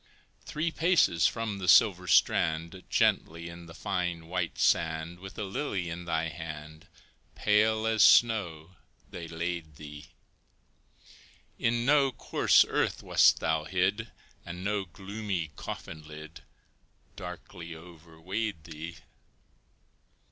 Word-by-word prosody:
Three 160 +2 -2
paces 160 - +3
from 110 -3 -3
the 90 - -4
silver 90 -5 +5
strand, 80 +2 +2
Gently 85 +1 +1
in 85 0 -11
the 80 - -12
fine, 90 -3 -3
white 85 0 -3
sand, 80 +1 +1
With 95 +1 -10
a 105 - -3
lily 95 - -3
in 90 +1 -6
thy 80 -1 -1
hand, 80 -1 -9 0.5
Pale 110 +1 +2
as 110 -1 +2
snow, 90 -9 +4 0.4
they 85 -1 -7
laid 80 -1 -4
thee; 75 -1 -10 1.5
In 115 0 +1
no 140 -1 +4
coarse - - +3
earth - - -1
wast - - +4
thou 80 -1 0
hid, 95 +6 0 0.3
And 90 +2 -7
no 105 -1 -1
gloomy 95 -2 -5
coffin 80 - -7
lid 75 0 -10 0.7
Darkly 90 -1 -8
overweighed 85 +3 -6
thee. 80 +2 -8
85 Hz, 115 wpm, -29 LUFS, 80-105 Hz, 1.5 s, silver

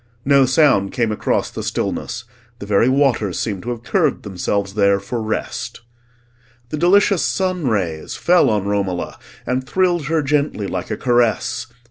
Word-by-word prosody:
No 140 -1 +5
sound 130 -8 +3
came 115 -3 0
across 105 - -1
the - - -5
stillness; 115 - -3 0.3
the 100 - -8
very 105 +4 +3
waters 130 -8 +1
seemed 100 -4 -3
to 120 - -6
have 120 -1 -5
curved 160 -4 0
themselves 100 0 -2
there 100 -1 +3
for 110 +4 -4
rest. 110 +1 -4 0.9
The 155 - -3
delicious 190 +3 +4
sun 185 -5 -1
rays 90 -9 -2
fell 175 -6 +3
on 105 -3 0
Romola 100 -3 -2 0.3
and 130 +1 -1
thrilled 175 +1 +1
her 160 -1 +1
gently 145 -6 0
like - - -4
a 105 - -3
caress. 120 0 +1
120 Hz, 155 wpm, -19 LUFS, 100-145 Hz, 0.9 s, No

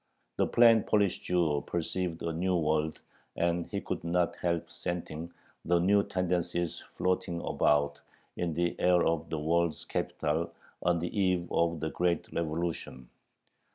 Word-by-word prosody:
The - - +2
plain 115 -2 +6
Polish 100 -2 +2
Jew 85 -5 +1
perceived 85 0 -2
a 85 -1 -1
new 90 +3 0
world, 80 -1 0 0.4
and 85 0 0
he - - -3
could - - -4
not 85 0 +1
help 85 -2 -1
scenting 85 -1 -5 0.3
the 85 +1 +3
new 100 +4 +4
tendencies 90 -3 -1 0.2
floating 90 -2 0
about 70 -3 +1 0.3
in 85 -3 -2
the 85 +1 0
air 90 -1 +4
of 80 0 0
the 80 - -2
world's 85 +1 0
capital 80 +3 -1 0.3
on 90 -1 +2
the 85 +1 -4
eve 90 -3 +1
of 85 -2 +1
the 80 - -2
great 85 -2 0
Revolution. 80 -6 -3
85 Hz, 145 wpm, -30 LUFS, 80-90 Hz, 0.4 s, plain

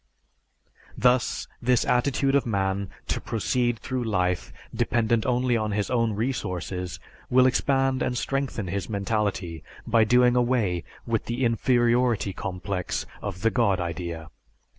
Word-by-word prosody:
Thus 125 -1 +2
this 125 0 +2
attitude 135 +2 +2
of 140 -2 +4
man 100 -2 -1 0.2
to - - -1
proceed 120 +1 0
through 130 +1 -3
life 90 -5 0 0.2
dependent 115 -1 +1
only 125 0 +2
on 110 -2 -1
his 105 +2 -1
own 115 -3 +2
resources 90 -6 -3 0.3
will 130 0 +5
expand 135 0 +2
and 125 - 0
strengthen 135 -5 -2
his 95 +1 -3
mentality 100 -6 -2 0.2
by 115 -1 +4
doing 125 +2 +4
away 120 -9 +1 0.2
with 115 -2 -1
the 120 +2 -1
inferiority 120 -2 +2
complex 90 0 -3 0.2
of 100 -2 -5
the 115 - +3
God 100 -6 +2
idea. 85 -2 -4
115 Hz, 130 wpm, -26 LUFS, 95-125 Hz, 0.3 s, will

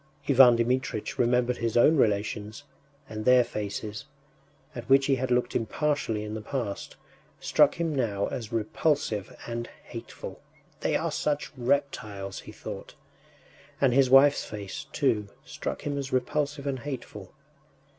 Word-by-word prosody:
Ivan 130 -3 +7
Dmitritch 120 -2 -1
remembered 125 0 +2
his 115 0 -1
own 150 +7 +6
relations, 105 0 0 0.4
and 110 -2 -6
their 125 +1 +6
faces, 105 +2 -5 0.7
at 120 -1 -8
which 135 0 +6
he 135 -1 +2
had 130 0 -2
looked 125 0 +1
impartially 115 -2 -1
in 105 0 -5
the 110 - -4
past, 110 -4 -4 0.4
struck - - +4
him 165 -2 -1
now 110 -7 0
as 115 -3 -5
repulsive 115 -1 -1
and 120 0 -4 0.2
hateful. 115 - -9 0.4
“They - - 0
are - - 0
such 150 0 -1
reptiles!” 120 -7 -2
he - - -10
thought. - - -8 0.8
And 135 -3 +3
his 135 0 +4
wife’s 140 +2 +6
face, 100 -2 -7
too, 110 -8 +1 0.2
struck - - -5
him 145 -1 -2
as 135 -1 -5
repulsive 140 +3 -1
and 135 -2 -2
hateful. 120 -7 -7
125 Hz, 140 wpm, -27 LUFS, 110-140 Hz, 0.8 s, Ivan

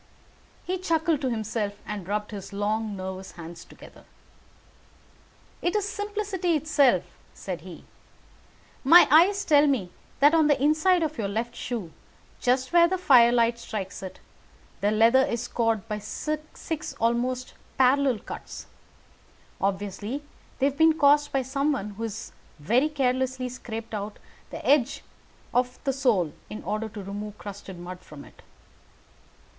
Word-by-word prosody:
He 370 +1 -2
chuckled 325 -4 +1
to 260 - 0
himself 215 -2 -2
and 205 -4 -6
rubbed 210 +1 -2
his 200 -2 -7
long 210 +1 -1
nervous 190 0 -6
hands 170 0 -10
together. - - -15 1.6
"It 350 - 0
is 415 -1 +1
simplicity 410 -4 -2
itself," 290 -3 +3 0.3
said - - -6
he, - - -11 1.0
"my 330 +6 +8
eyes 380 +6 +5
tell 295 -1 +5
me 220 -11 0 0.3
that 290 +3 +6
on 320 -2 +5
the 290 -2 +3
inside 310 +5 +3
of 305 -4 -3
your 205 - 0
left 225 +4 -3
shoe, 215 -10 -5 0.5
just 255 +4 +1
where 340 0 +7
the 375 +2 -1
firelight 240 -6 +5
strikes 200 -4 -6
it, 190 -1 -8 0.6
the 205 - +2
leather 225 +5 +5
is 240 -4 -2
scored 225 -3 -1
by 210 0 -3
six 305 +7 -5
almost 245 +2 0 0.2
parallel 265 -1 +4
cuts. - - -9 1.0
Obviously 205 +7 -2 0.3
they 265 - +1
have 280 0 0
been 320 0 +5
caused 290 0 +4
by 270 -1 0
someone 275 -4 -1
who 205 +2 -10
has 225 0 -5 0.3
very 235 - +2
carelessly 260 -2 0
scraped 225 -3 -7
round 210 0 -4 0.4
the - - -8
edges 275 -2 +2 0.5
of 250 0 +1
the 275 -2 0
sole 220 - +1 0.2
in 215 - -7
order 215 +2 -3
to 205 -2 -8
remove 205 +2 -6
crusted 200 -2 -9
mud 180 +1 -8
from 150 -5 -12
it. - - -18
245 Hz, 140 wpm, -26 LUFS, 210-295 Hz, 1.6 s, my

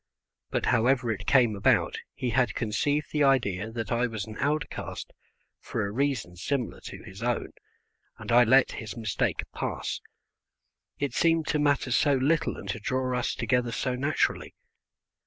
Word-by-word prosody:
But - - -1
however 125 0 +2
it 105 - -5
came 120 -6 +4
about 100 - +2 0.2
he 130 -3 -2
had 125 +1 +2
conceived 145 +7 0
the 150 -1 +2
idea 110 -7 +2
that 115 -2 -5
I 120 +1 +2
was 110 -4 -4
an 110 - -9
outcast 145 +1 -3 0.5
for 110 - -3
a 100 - -4
reason 125 -7 -1
similar 125 +7 -2
to - - -8
his 95 +3 -11
own, 120 0 -1 0.7
and - - -6
I 120 +1 +7
let 130 +3 +5
his 110 0 -7
mistake 110 -4 -1
pass, - - -3 1.0
it 140 -4 -2
seemed 165 +2 +2
to 150 - +1
matter 145 -3 +2
so 145 +3 +4
little 155 +5 +1
and - - -9
to 115 - -2
draw 130 +3 -1
us 125 - -1
together 125 -2 0
so 130 +2 -1
naturally. 140 +5 -1
125 Hz, 160 wpm, -27 LUFS, 110-140 Hz, 1.0 s, I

